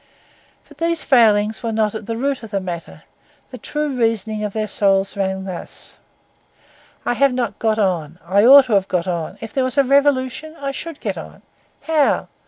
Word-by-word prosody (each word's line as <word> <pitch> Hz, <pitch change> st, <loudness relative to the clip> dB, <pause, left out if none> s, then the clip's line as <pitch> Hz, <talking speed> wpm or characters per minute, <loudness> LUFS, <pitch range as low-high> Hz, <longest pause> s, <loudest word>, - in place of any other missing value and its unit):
But -, -, -18 dB
these 335 Hz, -1 st, 0 dB
failings 220 Hz, -4 st, +3 dB
were 230 Hz, -2 st, -2 dB
not 215 Hz, -1 st, 0 dB
at 220 Hz, -2 st, -7 dB
the 230 Hz, -1 st, -3 dB
root 275 Hz, +2 st, -1 dB
of 225 Hz, -, -9 dB
the 200 Hz, -2 st, -1 dB
matter; 175 Hz, -3 st, -7 dB, 0.5 s
the 255 Hz, -, -9 dB
true 300 Hz, +6 st, -2 dB
reasoning 220 Hz, -3 st, -1 dB
of 210 Hz, -, -2 dB
their 215 Hz, +1 st, -2 dB
souls 195 Hz, -1 st, +1 dB
ran 190 Hz, -1 st, -2 dB
thus—I 190 Hz, +5 st, -10 dB
have 275 Hz, +1 st, +2 dB
not 235 Hz, -5 st, -3 dB
got 220 Hz, -1 st, +1 dB
on; 175 Hz, -6 st, -1 dB
I 195 Hz, +4 st, +3 dB
ought 270 Hz, +3 st, +9 dB
to 240 Hz, -, -2 dB
have 195 Hz, -1 st, +2 dB
got 175 Hz, -2 st, -1 dB
on; 175 Hz, +1 st, -3 dB
if 225 Hz, -, -8 dB
there 265 Hz, -, +1 dB
was 255 Hz, +2 st, -2 dB
a 280 Hz, -, +6 dB
revolution 280 Hz, +3 st, +1 dB
I 275 Hz, -1 st, -3 dB
should 325 Hz, +2 st, -7 dB
get -, -, -3 dB
on. -, -, -12 dB, 0.4 s
How? 310 Hz, -3 st, +1 dB
220 Hz, 190 wpm, -20 LUFS, 195-270 Hz, 0.5 s, ought